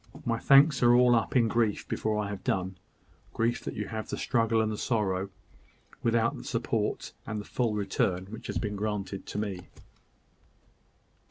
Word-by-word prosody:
My 115 -1 0
thanks 140 +1 +6
are 120 0 +6
all 125 0 +6
up 115 +2 +1
in 120 -3 +5
grief 110 -2 0
before 110 -1 -1
I 105 -1 -1
have 100 -2 -6
done 95 0 -1 0.6
grief 115 +1 0
that - - -5
you 105 - -3
have 110 -1 -5
the - - -3
struggle 115 -2 +1
and 110 -1 +1
the - - -2
sorrow, 100 -5 0 0.7
without 115 0 +2
the - - -9
support - - -2
and 110 -1 -3
the 105 - -7
full 115 -4 -1
return 95 -2 0
which 110 +3 -9
have - - -2
been 105 -2 -3
granted 100 -2 -3
to - - -5
me." 95 -4 -4
110 Hz, 175 wpm, -29 LUFS, 100-115 Hz, 0.7 s, thanks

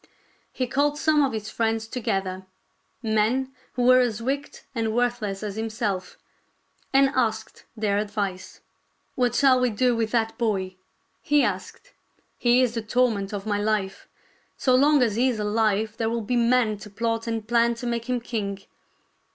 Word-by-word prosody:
He 255 - -2
called 285 +3 +1
some 300 -1 +3
of 275 - +1
his 215 -1 -5
friends 225 -1 -1
together 190 -5 -3 0.3
— - - -44 0.2
men 260 +5 +1 0.2
who 245 - -1
were 255 +1 +6
as 235 -4 +1
wicked 275 +4 -3
and 225 -2 -1
worthless 240 -5 -1
as 210 -1 -5
himself 215 -4 -3 0.4
— - - -44 0.3
and 270 0 +5
asked 220 -4 -2
their 205 -2 +1
advice. 205 -3 -4 0.3
" - - -45
What 250 -1 +1
shall 265 -2 +5
we 250 0 +2
do 240 +3 +1
with 225 -1 0
that 225 -1 -1
boy? 190 -5 -1 0.2
" - - -45
he 295 -1 +5
asked. - - -4 0.2
" - - -39
He 245 +1 +4
is 240 -2 0
the 230 - -2
torment 220 -3 0
of 200 -1 -5
my 205 -1 0
life. 205 -2 -2 0.5
So 255 - +2
long 285 +1 +5
as 220 -3 0
he 255 +2 +3
is 240 - -2
alive 215 0 0
there 225 -1 0
will 230 0 -1
be 245 +4 -1
men 235 -2 +2
to 210 - -10
plot 230 +2 -2
and 225 -2 -3
plan 235 0 +3
to 235 - -7
make 235 0 -3
him 250 -1 0
king. 205 -4 -3
230 Hz, 185 wpm, -25 LUFS, 210-250 Hz, 0.5 s, were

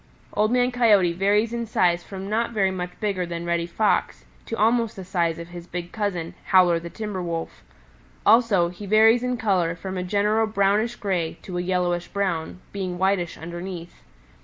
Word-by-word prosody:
"Old 215 +2 +2
Man 250 0 +2
Coyote 210 -8 +4
varies 205 +5 +2
in 235 -1 -3
size 175 -5 +2
from 195 0 -7
not 225 +3 0
so - - -12
very 195 -2 +2
much 180 -1 -5
bigger 200 -4 -1
than 170 -1 -5
Reddy 170 0 0
Fox 210 +5 0 0.2
to 230 - -4
almost 230 +1 +2
the 190 - -8
size 170 -3 0
of 170 0 -8
his 175 0 -9
big 175 -1 -6
cousin, 190 -6 -3
Howler 180 -3 +5
the 170 +1 -8
Timber 210 -1 -5
Wolf. 165 -2 -4 0.6
Also 210 -6 +4
he 190 +3 -9
varies 220 +3 +5
in 250 0 -1
color 185 -7 +1
from 190 +2 -5
a - - -2
general 210 +4 +1
brownish 215 +2 +1
gray 180 -6 -2
to 180 -2 -4
a - - 0
yellowish 180 -1 0
brown, 185 -3 -2
being 185 -3 -3
whitish 190 -2 0
underneath. 175 +1 -7
190 Hz, 185 wpm, -24 LUFS, 175-215 Hz, 0.6 s, Howler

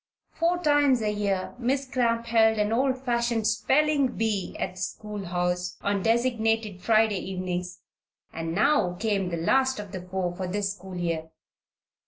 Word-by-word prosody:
Four 340 +2 +1
times 290 -5 +4
a 210 - +1
year 200 -3 -1
Miss 265 +3 0
Cramp 235 -3 0
held 220 -1 +4
an 210 0 +1
old 260 +2 +2
fashioned 235 -3 0
"spelling 270 +5 +2
bee" 215 -4 -1
at - - -2
the - - -17
schoolhouse, 180 -3 -3
on 200 -1 0
designated 225 -3 +1
Friday 220 -2 +3
evenings; 180 -1 -4 0.5
and 165 0 -4
now 210 -5 +3
came 200 -2 -1
the 170 - -3
last 260 +10 +2
of 205 -2 -7
the 190 -2 -5
four 180 -1 -3
for 185 0 -4
this 200 +1 -1
school 190 -1 -10
year. 165 -2 -2
210 Hz, 155 wpm, -26 LUFS, 185-235 Hz, 0.5 s, times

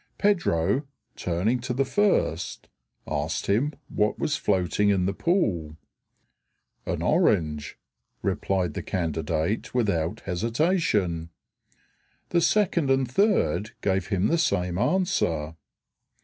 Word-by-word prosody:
Pedro, 140 - +1 0.3
turning 95 +8 0
to 125 0 -3
the 135 +1 +1
first, 105 - 0 0.4
asked - - -2
him 120 +9 +1 0.2
what 105 0 0
was 150 - 0
floating 100 - +1
in 95 -3 +2
the 100 - 0
pool. 95 - 0 1.1
"An - - -2
orange," 75 -3 +1 0.5
replied 95 -2 0
the - - -4
candidate 80 - -2
without 90 -9 0
hesitation. 105 - 0 1.0
The 170 - +2
second 170 -6 +2
and 135 -1 +2
third 175 - +1
gave 95 -2 0
him 95 -2 0
the 170 +8 +2
same 90 - 0
answer. 85 - 0
100 Hz, 105 wpm, -26 LUFS, -, 1.1 s, in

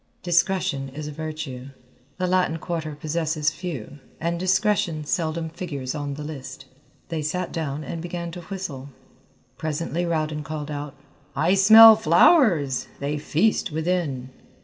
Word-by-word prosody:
Discretion 175 -6 +1
is 150 +3 -7
a - - -5
virtue. 155 -4 -6 0.5
The 185 - -1
Latin 180 -3 +1
Quarter 160 -3 -4
possesses 155 0 -1
few, 150 - -7 0.2
and 170 +1 -2
discretion 185 -4 +1
seldom 160 0 -1
figures 155 -7 -5
on 145 -2 -4
the 150 - -7
list. 135 -3 -8 0.4
They 165 -2 -2
sat 175 +4 -2
down 150 -2 -3
and 165 +2 -5
began 170 0 -5
to 175 +1 -8
whistle. 165 -7 -6 0.7
Presently 165 +3 -2
Rowden 155 -2 -1
called 150 +1 -5
out, 145 -1 -5 0.4
"I 160 +6 +2
smell 220 +3 +9
flowers. 170 - +4
They 145 +2 -2
feast 170 +6 +1
within!" 155 -6 -2
160 Hz, 135 wpm, -24 LUFS, 145-175 Hz, 0.7 s, smell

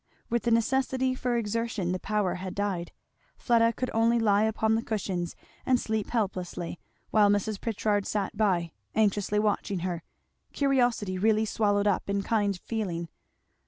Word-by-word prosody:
With 235 0 +2
the - - +3
necessity 260 +3 +2
for 250 -1 -1
exertion 225 -4 -1
the 185 - -1
power 210 -3 0
had 185 0 -6
died. 195 -4 -2 0.5
Fleda 230 -2 +3
could 255 +2 -3
only 230 +1 +3
lie 210 -2 +3
upon 220 0 +1
the 225 - +2
cushions, 190 -6 -3 0.3
and 255 -2 +3
sleep 220 -3 -2
helplessly, 185 -6 -2 0.3
while 210 -2 +5
Mrs. 205 0 0
Pritchard 210 -2 0
sat 205 -1 -2
by, 185 -6 +1 0.2
anxiously 210 -1 +2
watching 205 -3 0
her; 175 -2 -2 0.5
curiosity 245 -9 +1
really 220 +2 +3
swallowed 205 -2 +1
up 200 -1 +1
in 200 0 0
kind 205 -3 0
feeling. 175 -7 -3
210 Hz, 150 wpm, -28 LUFS, 195-230 Hz, 0.5 s, while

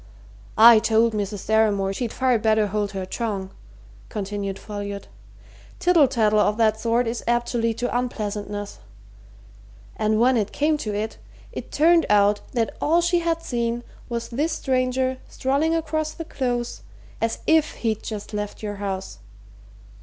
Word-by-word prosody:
"I 225 0 +9
told 225 +1 +2
Mrs. 205 -1 -3
Deramore 205 -3 +2
she'd 235 +2 -3
far 255 -3 +2
better 215 0 +3
hold 205 0 -2
her 190 -1 -3
tongue," 195 -2 -3 0.6
continued 200 -1 -4
Folliot. 205 -1 -6 0.7
"Tittle 340 -6 +4
tattle 215 -4 +2
of 210 0 +2
that 220 -1 +2
sort 235 +2 +1
is 230 +1 -3
apt 240 0 +1
to 240 - -1
lead 230 -1 0
to 245 0 -2
unpleasantness. 205 - -3 1.2
And 215 0 +1
when 250 +2 +4
it 210 -2 -1
came 305 +2 +1
to 210 -5 -3
it, 215 +2 -3 0.3
it - - -7
turned 330 +2 +4
out 205 0 +4
that 230 -3 -1
all 335 +3 +3
she 345 0 +2
had 330 -1 -1
seen 235 -2 -2 0.3
was 235 -1 -3
this 295 +7 -1
stranger 260 -1 0
strolling 285 +5 0
across 310 -1 -1
the 330 - -7
Close 245 -5 -3 0.4
as 225 0 0
if 315 -1 +3
he'd 220 -1 0
just 215 -1 -6
left 210 +1 -4
your 205 -1 -4
house. 190 - -5
225 Hz, 155 wpm, -23 LUFS, 210-255 Hz, 1.2 s, I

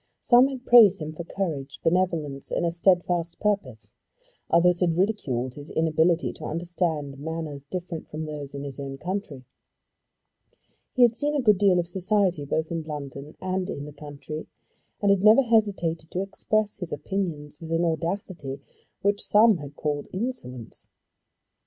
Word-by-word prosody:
Some 245 +2 +6
had 260 -2 -7
praised 215 -5 +7
him 155 0 -5
for 170 - -6
courage, 145 -9 -4
benevolence, 165 -6 0
and - - 0
a 170 - +1
steadfast 175 -1 +1
purpose. 195 - -2 0.6
Others 175 +1 +4
had 170 -3 +1
ridiculed 135 - 0
his 145 +2 -10
inability 160 +1 +2
to - - -9
understand 160 -4 -2
manners 155 -2 -5
different 175 +1 -5
from 155 +1 -5
those 145 -2 -6
of 140 - -5
his 140 -1 -6
own 135 -1 -5
country. 175 -5 -5 1.5
He 255 - +5
had 235 -1 +6
seen 295 +3 +1
a - - +2
good 210 -7 +4
deal 195 -3 +4
of 175 -1 0
society 185 -3 +1
both 160 +3 -1
in 165 -1 -1
London 145 -1 -7
and 185 0 -2
in 140 - -5
the 150 - -9
country, 150 +1 -8 0.6
and 200 - +5
had 200 -1 +2
never 220 +6 +7
hesitated 195 -9 +1
to 185 - -2
express 210 +1 -1
his 180 -4 -6
opinions 150 -3 -4
with 160 - -8
an 165 +1 +2
audacity 165 -3 -3 0.4
which 200 +1 +1
some 215 -1 +5
had 145 -2 -9
called 145 -1 -2
insolence. 185 - -5
170 Hz, 160 wpm, -26 LUFS, 150-195 Hz, 1.5 s, praised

